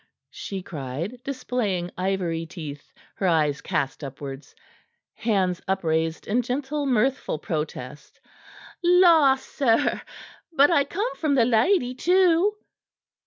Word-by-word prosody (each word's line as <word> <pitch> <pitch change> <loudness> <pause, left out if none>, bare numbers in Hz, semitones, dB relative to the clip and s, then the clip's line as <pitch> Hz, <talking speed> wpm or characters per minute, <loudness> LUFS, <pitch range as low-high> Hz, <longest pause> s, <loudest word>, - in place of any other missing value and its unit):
she 195 -2 -6
cried, 160 - -6
displaying 240 -10 -2
ivory 180 -3 -1
teeth, 150 -4 -9 0.3
her 190 - 0
eyes 150 -4 +2
cast 140 +1 -2
upwards, 135 0 -8 0.6
hands 185 -5 0
upraised 165 -4 -1
in 235 +4 +1
gentle, 280 +4 -2
mirthful 255 - +1
protest. 150 -3 -6 0.6
"La, 340 -6 +6
sir! 265 -3 0 0.5
But 290 +1 +5
I 285 -4 +3
come 415 - -3
from 300 -3 +1
the 240 -4 +4
lady, 250 - +2
too." 360 +6 +3
215 Hz, 110 wpm, -24 LUFS, -, 0.6 s, La